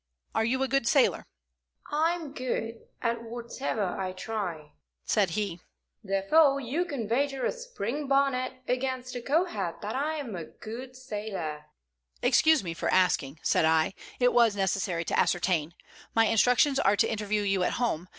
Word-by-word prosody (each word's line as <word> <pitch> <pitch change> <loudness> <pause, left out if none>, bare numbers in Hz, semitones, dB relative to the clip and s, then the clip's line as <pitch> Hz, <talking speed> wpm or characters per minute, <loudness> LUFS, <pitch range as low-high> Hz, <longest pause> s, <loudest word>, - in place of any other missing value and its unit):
Are 220 - +2
you 260 +4 +1
a - - +1
good 270 -2 +1
sailor?" 275 -2 +3 0.6
"I'm 320 0 0
good 235 -3 -4 0.2
at 230 -1 0
whatever 235 0 -4 0.2
I 185 -1 -2
try," 185 -7 -4 0.3
said 200 -3 +2
he. 200 -5 -2 0.4
"Therefore 275 +10 +3
you 280 +8 -1
can 275 -10 -4
wager 270 +3 0
a - - +2
spring 300 - -4
bonnet 260 -2 +1
against 255 0 -2
a 245 - -3
Kohat 255 - -1
that 210 +3 -4
I 300 +4 -1
am 270 -9 -5
a 170 -2 -5
good 245 +8 -9
sailor." 205 - -5 0.6
"Excuse 315 -5 +5
me 170 -2 -4
for 165 - -2
asking," 160 -5 +2
said - - +3
I. 160 +2 +3 0.3
"It 245 -1 +4
was 230 -4 +4
necessary 190 -3 0
to - - 0
ascertain. 175 -2 +1 0.4
My 225 0 +5
instructions 250 +6 +4
are 200 -5 +4
to - - +3
interview 210 -1 -1
you 195 -2 +1
at 180 - +1
home. 185 -8 -1
230 Hz, 160 wpm, -28 LUFS, 195-270 Hz, 0.6 s, Excuse